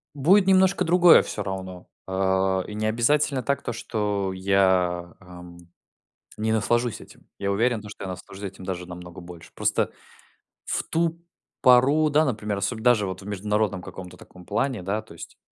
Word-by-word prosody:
Будет 185 +8 +4
немножко 190 0 +4
другое 175 0 +6
всё - - -5
равно, 95 -2 -6 0.2
а, 95 0 0
и 105 - -8
не 110 0 -2
обязательно 135 +4 +1
так 140 0 -1
то, - - -4
что 105 -4 -2
я, 95 -2 +1
ам, 90 -1 -13 0.8
не 110 +1 -1
наслажусь 120 +2 0
этим, - - -16
я 100 0 -2
уверен, 115 +3 +1
то, 105 - -10
что 105 - -9
я - - -5
наслажусь 95 +2 -9
этим 95 -1 -7
даже 90 -1 -5
намного 90 0 -10
больше. 85 -1 -12
Просто - - 0 0.8
в - - -2
ту 165 0 -1 0.4
пору, 140 +5 +5
да, 150 +2 +3
например, 105 -6 -2
особ 100 +4 -2
даже 110 -3 +3
вот 95 0 -5
в - - -13
международном 105 -1 -1
каком-то 90 -1 -10
таком 90 -1 -16
плане, 130 -2 -1
да, 100 +4 -2
то 110 - -15
есть 85 - -11
105 Hz, 170 wpm, -24 LUFS, 95-125 Hz, 0.8 s, другое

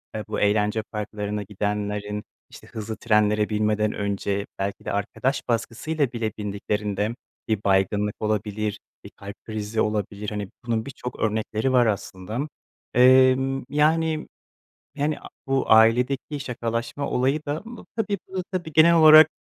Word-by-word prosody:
eee, 110 - -3
bu - - -3
eğlence 105 +1 +2
parklarına 105 -1 -3
gidenlerin, 105 +1 -3 0.3
işte - - -14
hızlı 110 0 -6
trenlere 105 -1 +2
binmeden 105 0 +1
önce 100 0 -2
belki 100 +1 -3
de - - -2
arkadaş 125 +7 -1
baskısıyla 120 +5 -1
bile 115 -3 -2
bindiklerinde, 105 +1 -2 0.3
bir 110 -2 -1
baygınlık 100 +1 +1
olabilir, 105 0 -2 0.2
bir - - -10
kalp 100 0 -10
krizi 110 0 -2
olabilir, 105 -1 -2
hani, 105 -2 -4 0.2
bunun 115 -2 -1
birçok 125 -2 -7
örnekleri 110 +3 0
var 125 -2 +5
aslında. 105 0 -3 0.5
Emm, 130 +1 +5
yani, 155 +2 +2 0.7
hani, 150 +1 0
a - - -11 0.2
bu 135 -3 0
ailedeki 125 +6 +4
şakalaşma 120 +1 -3
olayı 135 +4 +1
da, 145 +2 -2
ımm, 235 +1 -10
tabii, 205 -3 -1 0.2
ııı, 185 -1 -2
tabii 175 -4 -3
genel 160 +2 +7
olarak, 155 -1 +9
110 Hz, 135 wpm, -24 LUFS, 105-135 Hz, 0.7 s, olarak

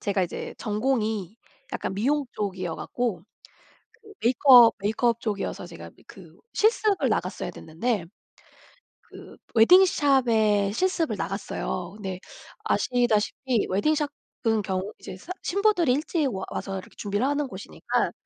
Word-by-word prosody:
제가 200 -2 0
이제 175 - -5
전공이 215 -3 -1 0.4
약간 - - -3
미용 280 +8 +1
쪽이어갖고 190 +1 -3 0.7
그 440 -2 -18
메이크업 245 0 +7
메이크업 225 +3 +1
쪽이어서 205 -3 -3
제가 - - -10
뭐 - - -31
그 - - -14 0.2
실습을 430 -2 +2
나갔어야 - - -2
됐는데 175 +4 -3 1.0
그 - - -14 0.2
웨딩샵에 230 - +4
실습을 340 - 0
나갔어요. 185 -1 -4
근데 190 -3 -6 0.5
아시다시피 240 -1 +1
웨딩샵은 275 -1 -1
경우 190 +1 -3
이제 190 -1 -9
산 355 - -7
신부들이 375 -8 +2
일찍 305 +1 0
와 190 -1 -4
와서 195 - -4
이렇게 185 - -11
준비를 205 +3 -1
하는 285 +1 0
곳이니까 205 -5 -2
225 Hz, 300 characters per minute, -25 LUFS, 200-285 Hz, 1.0 s, 메이크업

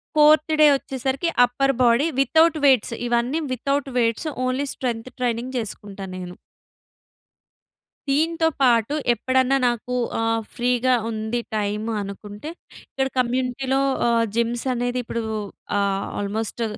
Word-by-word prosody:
Fourth 305 +1 +5
day 305 - +9
వచ్చేసరికి 270 +4 -2 0.2
upper 275 +3 0
body, 240 +5 +4
without 320 +4 +4
weights 260 -4 +4
ఇవన్నీ 240 +6 0
without 275 +2 -1
weights, 230 +6 0 0.2
only 265 +3 -1
strength 245 -1 -4
training 245 +1 -2
చేసుకుంటా 205 -3 -6
నేను. 180 -1 -7 1.7
దీంతో 320 +4 +2
పాటు 240 0 +3 0.2
ఎప్పుడన్నా 260 +3 +2
నాకు 240 +1 -2 0.2
ఆహ్, 225 0 +1
ఫ్రీ‌గా 250 +1 +2 0.2
ఉంది 220 +1 -2 0.2
టైమ్ 210 +1 -2
అనుకుంటే, 205 +6 -8 0.4
ఇక్కడ 265 0 -1
కమ్యూనిటీ‌లో 255 +2 0 0.3
ఆహ్, 230 -1 +3
జిమ్స్ 235 +1 0
అనేది 245 +1 -1
ఇప్పుడు 230 0 -4 0.6
ఆహ్, 195 -1 0
ఆల్మోస్ట్ 215 +3 -3
245 Hz, 115 wpm, -23 LUFS, 225-270 Hz, 1.7 s, day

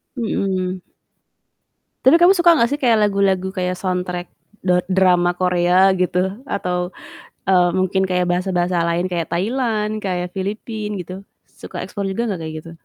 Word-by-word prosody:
Mhm. 190 -6 -2 1.2
Tapi 315 +6 +7
kamu 350 +3 +6
suka 345 -3 +5
gak 235 +1 +3
sih 290 - -2
kayak 235 -3 +4
lagu-lagu 195 -2 +1
kayak 180 -1 -2
soundtrack 180 -1 -3 0.4
da 180 -1 +3
drama 180 -2 +3
Korea 180 +1 +3
gitu 180 0 0 0.3
atau, 180 -2 -2 0.6
eee, 180 -2 +4
mungkin 190 +1 +1
kayak 180 0 +1
bahasa-bahasa 180 -1 0
lain 175 +2 0
kayak 170 -2 -3
Thailand 215 +1 -1
kayak 180 -2 -2
Filipina 210 +1 -4
gitu 180 +2 -9 0.3
suka - - -10
explore 200 -2 -4
juga 235 +5 -2
gak 170 - -7
kayak 160 0 -6
gitu? 165 - -11
185 Hz, 145 wpm, -20 LUFS, 180-210 Hz, 1.2 s, Tapi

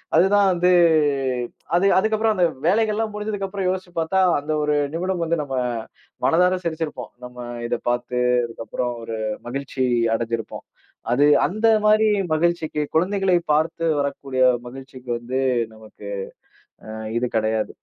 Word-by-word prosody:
அதுதான் 195 +4 +4
வந்து, 180 +1 +2 1.1
அது 185 - +2
அதுக்கப்புறம் 220 +2 +2
அந்த 180 - +4 0.2
வேலைகள்லாம் 215 +2 +1
முடிஞ்சதுக்கு 210 -2 -3
அப்புறம் 190 -1 -2
யோசிச்சு 185 -1 -4
பார்த்தா, 190 +4 +1 0.2
அந்த 150 +2 -5
ஒரு 150 0 +1 0.2
நிமிடம் 180 0 -1
வந்து 170 +1 0
நம்ம 135 -2 -5 0.7
மனதார 180 +2 +3
சிரிச்சிருப்போம். 160 -6 -4
நம்ம 125 0 -12 0.3
இதப் - - -3
பார்த்து 120 0 -1 0.3
அதுக்கப்புறம் 115 +1 -4
ஒரு 115 -1 -5 0.3
மகிழ்ச்சி 135 +1 -2 0.3
அடைஞ்சிருப்போம். 115 -1 -4 0.5
அது 140 +4 +4 0.2
அந்த 215 +4 0 0.2
மாரி 215 +1 +5 0.3
மகிழ்ச்சிக்கு 160 -1 0
குழந்தைகளை 190 +2 +2 0.2
பார்த்து 160 +2 0
வரக்கூடிய 140 -2 -2 0.3
மகிழ்ச்சிக்கு 130 0 -11
வந்து 125 +2 -3 0.3
நமக்கு 110 -2 -13 0.8
ஆ - - -11 0.3
இது 125 - 0
கடையாது. 110 0 0
160 Hz, 125 wpm, -22 LUFS, 125-190 Hz, 1.1 s, மாரி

